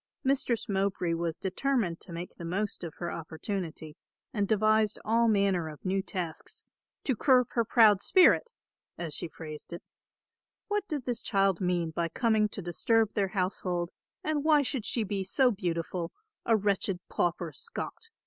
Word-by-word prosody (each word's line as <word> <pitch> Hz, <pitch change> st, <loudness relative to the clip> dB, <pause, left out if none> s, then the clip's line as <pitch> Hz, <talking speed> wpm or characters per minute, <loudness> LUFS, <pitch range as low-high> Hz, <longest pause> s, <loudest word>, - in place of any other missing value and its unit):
Mistress 260 Hz, -4 st, +1 dB
Mowbray 190 Hz, -3 st, 0 dB
was 165 Hz, -1 st, -2 dB
determined 195 Hz, -2 st, 0 dB
to -, -, -10 dB
make 170 Hz, +1 st, -6 dB
the -, -, -9 dB
most 190 Hz, +5 st, -2 dB
of 165 Hz, -2 st, -6 dB
her 170 Hz, -1 st, -4 dB
opportunity 160 Hz, -1 st, -5 dB, 0.4 s
and 205 Hz, -3 st, 0 dB
devised 215 Hz, 0 st, +3 dB
all 230 Hz, +2 st, +3 dB
manner 195 Hz, -6 st, +2 dB
of 150 Hz, +3 st, -12 dB
new 190 Hz, +1 st, +1 dB
tasks 180 Hz, -4 st, -4 dB, 0.4 s
"to 260 Hz, -, +1 dB
curb 250 Hz, +1 st, +4 dB
her 235 Hz, -, +2 dB
proud 215 Hz, -3 st, +5 dB
spirit," 375 Hz, +5 st, +5 dB, 0.5 s
as 165 Hz, -3 st, -4 dB
she 175 Hz, -, -3 dB
phrased 155 Hz, -1 st, -9 dB
it. 170 Hz, -, -7 dB, 0.8 s
What 415 Hz, -1 st, -1 dB
did 290 Hz, -6 st, -3 dB
this 245 Hz, -2 st, -1 dB
child 195 Hz, -4 st, +2 dB
mean 175 Hz, -3 st, 0 dB
by 165 Hz, +1 st, -1 dB
coming 220 Hz, +2 st, +2 dB
to 200 Hz, -, -6 dB
disturb 220 Hz, +5 st, +2 dB
their 200 Hz, -2 st, +1 dB
household, 180 Hz, -2 st, -1 dB, 0.3 s
and 305 Hz, -2 st, 0 dB
why 300 Hz, -2 st, +5 dB
should 255 Hz, -4 st, -3 dB
she 230 Hz, -, 0 dB
be 195 Hz, -1 st, -2 dB
so 250 Hz, +7 st, +3 dB
beautiful, 175 Hz, -3 st, -2 dB, 0.4 s
a 225 Hz, -1 st, +5 dB
wretched 195 Hz, -2 st, 0 dB
pauper 175 Hz, -1 st, -1 dB
Scot? 455 Hz, -, -6 dB
195 Hz, 160 wpm, -30 LUFS, 175-230 Hz, 0.8 s, proud